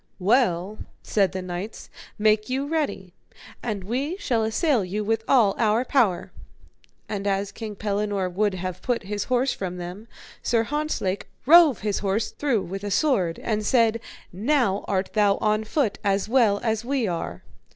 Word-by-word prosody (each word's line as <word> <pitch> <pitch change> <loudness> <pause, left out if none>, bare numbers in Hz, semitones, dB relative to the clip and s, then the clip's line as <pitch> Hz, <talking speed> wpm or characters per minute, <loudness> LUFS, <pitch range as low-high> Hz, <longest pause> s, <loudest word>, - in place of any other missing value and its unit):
Well, 200 -2 +1 0.2
said 195 -4 +1
the 185 0 -4
knights, 185 +4 -6 0.3
make 215 +1 +2
you 265 +2 -1
ready, 285 - -2 0.5
and 210 -5 -3
we 270 - -2
shall 250 - 0
assail 230 - +1
you 200 +4 -3
with 225 +1 0
all 230 -7 +4
our 225 +2 +2
power. 225 -12 +1 0.8
And 205 -1 -3
as 195 0 0
King 215 -1 -7
Pellinore 205 -1 -1
would 195 +2 0
have 185 0 -5
put 245 -3 -1
his 205 +1 -3
horse 255 +1 +1
from 180 -2 -5
them, 180 +5 -7 0.3
Sir 230 -2 +1
Hontzlake 295 -8 -2 0.2
rove 315 -3 +7
his 210 -2 -1
horse 205 +2 -1
through 260 -9 0
with 195 +3 -6
a 205 - -3
sword, 195 - +1
and 215 -1 -1
said: 230 0 +3 0.3
Now 220 -1 +1
art 190 -1 -1
thou 205 -2 +3
on 215 0 0
foot 240 -1 0
as 200 -1 +1
well 225 -4 +3
as 220 -1 0
we 255 -2 0
are. 170 -2 -4
215 Hz, 160 wpm, -24 LUFS, 195-245 Hz, 0.8 s, rove